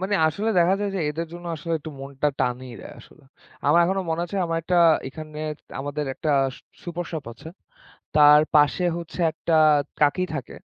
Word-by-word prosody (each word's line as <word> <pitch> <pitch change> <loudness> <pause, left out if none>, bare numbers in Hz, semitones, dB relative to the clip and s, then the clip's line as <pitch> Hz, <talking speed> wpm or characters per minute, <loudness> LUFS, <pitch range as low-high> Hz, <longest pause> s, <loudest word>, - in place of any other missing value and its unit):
মানে 195 +2 -1
আসলে 200 +8 -1
দেখা 175 +2 +4
যায় 205 -1 -1
যে - - -1
এদের 165 +2 -4
জন্য 175 0 -9
আসলে 165 +2 -5
একটু 155 +1 -9
মনটা 140 +1 -2
টানিই 125 0 -2
দেয় - - -11
আসলে। - - -19 0.4
আমার 150 +4 +5
এখনো 190 +2 0
মনে 160 +1 -1
আছে 200 - -6
আমার 165 0 -2
একটা 180 +2 0 0.3
এখানে 155 +2 -9 0.4
আমাদের 145 +2 -3
একটা 155 - -2 0.3
সু - - -17 0.2
সুপার 175 0 -5
শপ 155 -4 -4
আছে, 140 +7 -12 0.7
তার 150 0 +8
পাশে 150 +5 +4
হচ্ছে 170 +1 -9
একটা 165 +1 -3 0.5
কাকি 150 +5 +3
থাকে। 140 -4 -6
160 Hz, 180 wpm, -24 LUFS, 145-175 Hz, 0.7 s, তার